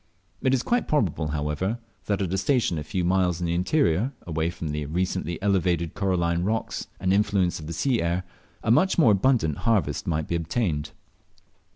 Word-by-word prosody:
It 130 - +2
is 125 - -1
quite 245 -1 +1
probable, 90 - +1
however, 75 +8 -1 0.3
that 100 -1 0
at 95 -1 -2
a - - +1
station 105 - +1
a - - -4
few 90 +4 -2
miles 90 -1 +2
in 90 - -2
the 85 - 0
interior, 100 - +1
away 80 -1 -1
from 85 -2 -5
the 75 -1 -3
recently 85 0 -2
elevated 90 -5 +1
coralline 85 -4 0
rocks 110 +4 -2
and 95 +1 0
the - - +4
influence 100 -4 +1
of 75 - -8
the 85 - -4
sea 120 - +1
air, 85 +2 0 0.4
a - - +2
much 185 +11 +4
more 130 -10 +6
abundant 100 - +2
harvest 95 -11 0
might 80 -2 -1
be - - -3
obtained. 85 -2 -1
90 Hz, 190 wpm, -25 LUFS, 80-105 Hz, 0.4 s, more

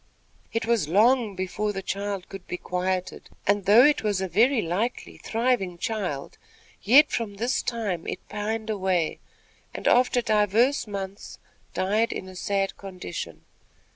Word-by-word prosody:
It 230 0 -1
was 225 -9 +1
long 220 +3 +3
before 195 +3 -2
the 195 -1 -5
child 200 -1 -3
could 195 -2 -10
be 180 - -4
quieted; 180 +1 -3 0.2
and, 205 -1 +2
though 220 +6 +7
it 295 0 +3
was 205 -3 0
a 190 - -1
very 240 +7 +3
likely, 205 +7 -2
thriving 225 -6 0
child, 190 - -4 0.4
yet 275 +9 +6
from 220 -4 -2
this 235 +5 0
time 210 -8 -3
it - - -6
pined 220 +1 -3
away, 185 -5 0 0.6
and, - - -3
after 245 0 +4
divers 220 +5 +2
months, 195 -1 -6 0.4
died 210 +5 +1
in 190 - -5
a 185 - -11
sad 195 +1 -1
condition. 175 - -7
205 Hz, 145 wpm, -26 LUFS, 185-230 Hz, 0.6 s, though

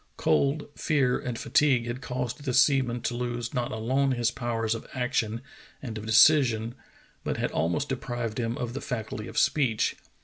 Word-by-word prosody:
Cold, 140 +2 +1
fear, 135 -6 +1
and 125 -2 -4
fatigue 130 -4 +2
had 120 +2 -4
caused 125 +2 -4
the 130 -3 -1
seaman 130 -3 +3
to - - -2
lose 120 -1 -3
not 120 -1 -1
alone 130 +5 +1
his 120 -2 +1
power 120 -2 -3
of 115 +1 -2
action 120 -3 -1 0.4
and 115 -5 -6
of 110 0 -6
de - - -2
cision, 120 -4 +5 0.5
but - - -2
had - - -1
almost 90 - -1
deprived 120 -4 -3
him 115 0 -2
of 120 -1 -4
the 140 - -5
faculty 115 -3 -4
of - - -9
speech. 125 -8 +2
120 Hz, 175 wpm, -27 LUFS, 115-135 Hz, 0.5 s, cision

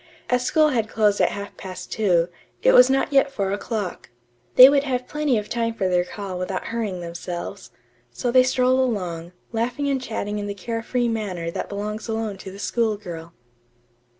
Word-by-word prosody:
As 250 0 +2
school 310 +3 +3
had 225 -6 0
closed 210 -2 +2
at - - +4
half 200 0 -7
past 185 -1 -8
two, 180 -6 +2 0.4
it - - +6
was 250 +1 +8
not 270 +2 +1
yet 275 0 +4
four 200 -7 -1
o'clock. 205 -2 -4 0.5
They 255 - +12
would 280 0 +4
have 255 -3 -2
plenty 300 -5 0
of 210 -1 -3
time 230 0 -1
for 195 -4 0
their 180 -1 +2
call 190 -1 -6
without 185 +1 -3
hurrying 210 -6 -2
themselves. 175 +3 -6 0.4
So 240 - -2
they 255 +1 +7
strolled 255 0 +2
along, 180 -9 -2 0.2
laughing 245 +5 -1
and 275 -2 0
chatting 210 -4 -3
in 205 - -4
the 200 - -4
care 225 +4 -4
free 245 +1 0
manner 195 -7 -3
that - - -4
belongs 210 +2 -4
alone 220 -3 -3
to 195 - -8
the 190 - -10
school 220 +1 0
girl. 170 -4 -8
215 Hz, 190 wpm, -23 LUFS, 190-250 Hz, 0.5 s, They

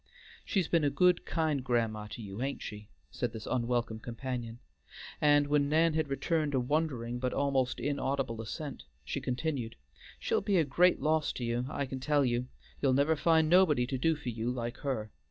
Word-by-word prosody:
"She's 190 -5 0
been 170 -3 +2
a 145 - +3
good, 180 +5 +3
kind 155 -4 0
grandma 115 -4 0
to 115 +2 -8
you, 100 +1 -7
hain't 135 +2 -3
she?" 105 -1 -8 0.2
said 120 - -3
this 110 -1 -7
unwelcome 120 -2 -1
companion, 120 0 -5 0.6
and 145 -1 +5
when 145 0 +2
Nan 160 +2 +3
had 155 -1 0
returned 145 +1 0
a - - +3
wondering 125 -3 -1
but 125 0 -1
almost 135 -2 +1
inaudible 135 -5 -1
assent, 140 +6 -6 0.2
she 140 - -3
continued, 125 -2 -2 0.4
"She'll - - 0
be 200 -2 +1
a 165 - +5
great 175 +6 +3
loss 155 0 +2
to 125 - -5
you, 120 +2 -1
I 140 - -2
can 130 0 -5
tell 145 +1 +2
you. 120 0 0 0.3
You'll 135 -2 +3
never 140 +4 +3
find 160 +1 +3
nobody 155 -7 +5
to 130 +1 -3
do 160 +4 +2
for 150 -4 -5
you 115 0 -2
like 120 -1 -3
her. 110 -7 -3
135 Hz, 190 wpm, -31 LUFS, 120-150 Hz, 0.6 s, and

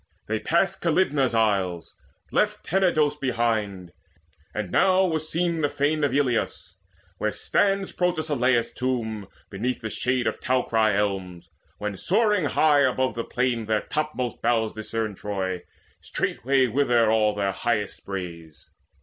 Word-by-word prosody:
They 110 0 -1
passed 185 - +1
Calydnae's 150 -7 +2
isles, 95 -6 0 0.4
left - - 0
Tenedos 160 -5 +2
behind; 110 -8 -1 0.6
And 105 -4 -4
now 190 0 +4
was 160 -3 -2
seen 170 0 0
the 145 - +2
fane 145 +2 0
of 145 - +2
Eleus, 130 -4 -1 0.5
Where - - +1
stands 195 -1 +1
Protesilaus' 145 -9 +1
tomb, 110 -5 -2 0.2
beneath 120 +6 -2
The 110 -2 -4
shade 125 -1 0
of - - -2
towery 110 -5 +2
elms; 95 -4 -2 0.3
when, 105 -1 -4
soaring 210 - +2
high 150 0 +4
Above 130 -1 +1
the 115 - -3
plain, 125 -2 -1
their 110 -1 +1
topmost 150 -6 -3
boughs 115 -2 +1
discern 110 0 -3
Troy, 95 -2 -3 0.4
straightway 135 +1 0
wither 120 -3 +2
all 105 -1 +2
their 100 -1 0
highest 105 -1 -1
sprays. 85 -5 -8
120 Hz, 130 wpm, -25 LUFS, 105-150 Hz, 0.6 s, now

